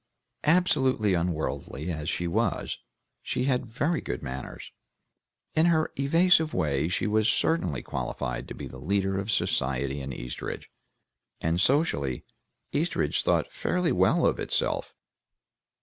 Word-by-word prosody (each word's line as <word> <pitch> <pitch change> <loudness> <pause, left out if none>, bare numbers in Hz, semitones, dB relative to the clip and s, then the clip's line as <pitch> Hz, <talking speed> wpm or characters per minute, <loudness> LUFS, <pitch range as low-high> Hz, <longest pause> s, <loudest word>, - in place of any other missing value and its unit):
Absolutely 130 - +3
unworldly 85 -2 -2
as 80 -1 -3
she 90 - -1
was, 85 - -1 0.4
she 125 - -2
had 130 -2 +1
very 145 +9 0
good 60 - -4
manners; 65 +1 -6 0.8
in 160 +2 +4
her 160 -2 +2
evasive 160 +3 +4
way 70 0 +1
she 90 - -1
was 110 +1 +3
certainly 90 - +1
qualified 60 -1 -3
to - - -7
be - - -6
the - - -9
leader 95 0 0
of 100 +2 -4
society 70 - 0
in 70 0 -5
Eastridge, - - -6 0.7
and 80 +2 +1
socially 80 - +1 0.5
Eastridge - - +1
thought - - +1
fairly 180 -2 0
well 95 +1 +3
of - - +2
itself. - - -1
95 Hz, 130 wpm, -27 LUFS, -, 0.8 s, in